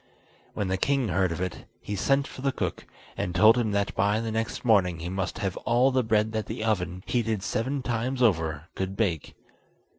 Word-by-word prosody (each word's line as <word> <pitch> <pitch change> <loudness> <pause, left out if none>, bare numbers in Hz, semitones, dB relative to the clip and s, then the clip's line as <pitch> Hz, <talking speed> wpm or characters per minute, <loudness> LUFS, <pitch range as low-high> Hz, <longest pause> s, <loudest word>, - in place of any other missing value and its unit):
When 100 - -1
the 95 0 0
king 135 -2 +1
heard 95 0 +1
of 85 - -4
it, 95 -2 -4
he 105 - -5
sent 135 +8 +2
for 130 - -9
the 135 0 +1
cook, - - -4 0.3
and 90 - -3
told 110 +5 +7
him 120 -3 +1
that 100 0 0
by 105 +1 +2
the 115 -1 -3
next 115 +2 -3
morning 95 -7 +4
he 85 +2 -5
must 95 0 -3
have 95 -2 -2
all 125 +3 +3
the 130 0 +2
bread 110 -1 +2
that 110 -1 -3
the - - -4
oven, 90 -4 -1
heated 115 -5 -1
seven 130 +5 -1
times 125 +2 -1
over, 80 - +2
could 95 +1 -4
bake. 90 -9 -1
110 Hz, 205 wpm, -27 LUFS, 95-120 Hz, 0.3 s, told